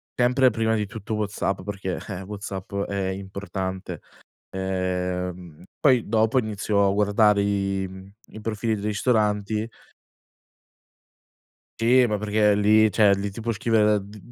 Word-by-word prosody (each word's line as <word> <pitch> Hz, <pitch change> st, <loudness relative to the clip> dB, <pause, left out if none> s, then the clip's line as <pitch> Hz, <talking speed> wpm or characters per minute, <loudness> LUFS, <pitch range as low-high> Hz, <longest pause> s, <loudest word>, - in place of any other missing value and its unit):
sempre 125 Hz, +1 st, +3 dB
prima 110 Hz, 0 st, 0 dB
di 105 Hz, -1 st, -1 dB
tutto 110 Hz, 0 st, -5 dB
WhatsApp, 100 Hz, -2 st, -2 dB
perché, 95 Hz, -2 st, -4 dB
eh, 95 Hz, -2 st, -5 dB
WhatsApp 100 Hz, -1 st, -7 dB
è 100 Hz, -1 st, -2 dB
importante. 95 Hz, -1 st, -5 dB, 0.5 s
Ehm, 90 Hz, -2 st, -3 dB, 0.2 s
poi 130 Hz, -5 st, +3 dB
dopo 110 Hz, +3 st, +2 dB
inizio 105 Hz, -2 st, 0 dB
a -, -, +2 dB
guardare 105 Hz, 0 st, +3 dB
i 95 Hz, -1 st, -1 dB, 0.4 s
i 110 Hz, -, -8 dB
profili 110 Hz, 0 st, -1 dB
dei 105 Hz, 0 st, -6 dB
ristoranti 105 Hz, 0 st, 0 dB, 2.1 s
Sì, 125 Hz, +3 st, +5 dB
ma 105 Hz, -3 st, 0 dB
perché 105 Hz, 0 st, +2 dB
lì, 110 Hz, +1 st, +4 dB
cioè, 105 Hz, -1 st, +4 dB
lì 100 Hz, +1 st, -3 dB
ti 100 Hz, +4 st, -8 dB
può 115 Hz, +1 st, -1 dB
scrivere 110 Hz, 0 st, +1 dB
da 105 Hz, 0 st, +4 dB
d 100 Hz, +2 st, -11 dB
105 Hz, 135 wpm, -24 LUFS, 95-110 Hz, 2.1 s, Sì